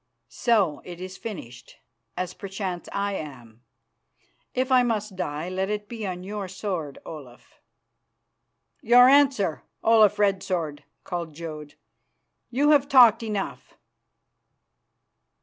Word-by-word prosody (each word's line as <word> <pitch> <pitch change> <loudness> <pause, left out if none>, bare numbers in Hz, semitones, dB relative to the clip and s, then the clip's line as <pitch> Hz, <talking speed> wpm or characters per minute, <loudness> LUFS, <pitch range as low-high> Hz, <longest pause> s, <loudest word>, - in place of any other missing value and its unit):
"So, 200 - +1
it 175 -1 -9
is 185 +1 -7
finished, 175 - -9 0.4
as 180 0 -3
perchance 190 -2 -5
I 200 0 -1
am. 125 - -8 0.9
If 255 +1 0
I 255 -1 +6
must 215 -4 -1
die, 155 -2 -3
let 190 +1 -2
it 210 0 -3
be 225 -3 -5
on 180 -1 -5
your 200 0 -5
sword, 180 -6 -4
Olaf." 130 -7 -12 1.2
"Your 245 +2 +7
answer, 265 - +3 0.2
Olaf 215 -2 +5
Red 200 -2 +2
Sword!" 160 -7 -3 0.2
called 170 -4 -5
Jodd. 155 -2 -8 0.7
"You 285 +5 +3
have 285 -2 +4
talked 245 -4 +7
enough." 210 -3 -5
195 Hz, 115 wpm, -25 LUFS, 170-225 Hz, 1.2 s, Your